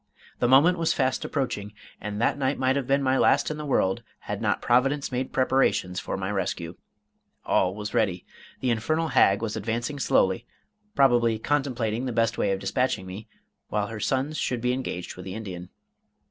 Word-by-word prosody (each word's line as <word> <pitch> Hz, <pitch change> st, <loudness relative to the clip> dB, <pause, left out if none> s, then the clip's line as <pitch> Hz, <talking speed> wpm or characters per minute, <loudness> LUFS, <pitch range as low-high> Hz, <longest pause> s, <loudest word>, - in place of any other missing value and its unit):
The 120 Hz, -, +2 dB
moment 155 Hz, +8 st, +5 dB
was 165 Hz, -, +2 dB
fast 130 Hz, -2 st, 0 dB
approaching, 105 Hz, -7 st, -3 dB, 0.3 s
and 105 Hz, 0 st, -4 dB
that 115 Hz, -, +2 dB
night 140 Hz, 0 st, 0 dB
might 130 Hz, 0 st, +2 dB
have 140 Hz, -3 st, -1 dB
been 140 Hz, +1 st, +2 dB
my 130 Hz, 0 st, +2 dB
last -, -, +3 dB
in 150 Hz, -, -4 dB
the 150 Hz, -1 st, -5 dB
world, 95 Hz, -8 st, +1 dB, 0.2 s
had -, -, -5 dB
not -, -, +1 dB
Providence 135 Hz, +4 st, +2 dB
made 130 Hz, +1 st, -2 dB
preparations 130 Hz, -8 st, +1 dB
for -, -, -4 dB
my 95 Hz, +1 st, -3 dB
rescue. 90 Hz, -4 st, -3 dB, 0.7 s
All 95 Hz, 0 st, +2 dB
was 105 Hz, 0 st, -5 dB
ready. 95 Hz, -5 st, 0 dB, 0.4 s
The 125 Hz, -, +1 dB
infernal 155 Hz, +9 st, 0 dB
hag 105 Hz, -6 st, +4 dB
was 110 Hz, -1 st, -2 dB
advancing 115 Hz, +6 st, -3 dB
slowly, 115 Hz, -2 st, +2 dB, 0.5 s
probably 120 Hz, -4 st, +4 dB
contemplating 125 Hz, -3 st, -1 dB
the -, -, -2 dB
best 115 Hz, 0 st, +1 dB
way 100 Hz, -, +1 dB
of 95 Hz, -, 0 dB
dispatching 95 Hz, +1 st, -1 dB
me, 95 Hz, +4 st, -8 dB, 0.4 s
while 105 Hz, -1 st, -1 dB
her 115 Hz, -1 st, -6 dB
sons 135 Hz, +7 st, -1 dB
should 125 Hz, -, -1 dB
be 125 Hz, +1 st, 0 dB
engaged 125 Hz, -9 st, -4 dB
with 90 Hz, -, -9 dB
the 95 Hz, 0 st, -6 dB
Indian. 90 Hz, -5 st, -7 dB
120 Hz, 185 wpm, -26 LUFS, 100-135 Hz, 0.7 s, moment